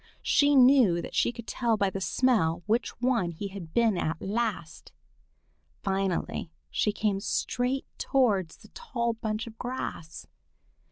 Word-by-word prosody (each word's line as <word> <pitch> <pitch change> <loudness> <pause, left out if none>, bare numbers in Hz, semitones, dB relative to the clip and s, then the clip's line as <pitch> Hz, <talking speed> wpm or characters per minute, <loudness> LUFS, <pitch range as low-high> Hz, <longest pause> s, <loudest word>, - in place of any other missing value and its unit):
She 285 0 +4
knew 250 -9 +6
that - - -7
she - - +2
could 235 -1 -10
tell 235 -2 0
by 200 -2 +1
the 195 - -5
smell 190 -8 +1
which 225 +4 -1
one 240 -8 +1
he 185 +4 -6
had 190 -5 -9
been 225 -4 +2
at 160 0 -2
last. 200 -7 -3 0.9
Finally 190 -3 -1 0.2
she 210 - +1
came 205 -2 0
straight 250 +6 -1
towards 205 -11 +1
the - - -17
tall 235 - -2
bunch 220 0 -3
of 225 -1 -12
grass. 245 -10 -5
215 Hz, 145 wpm, -28 LUFS, 190-245 Hz, 0.9 s, knew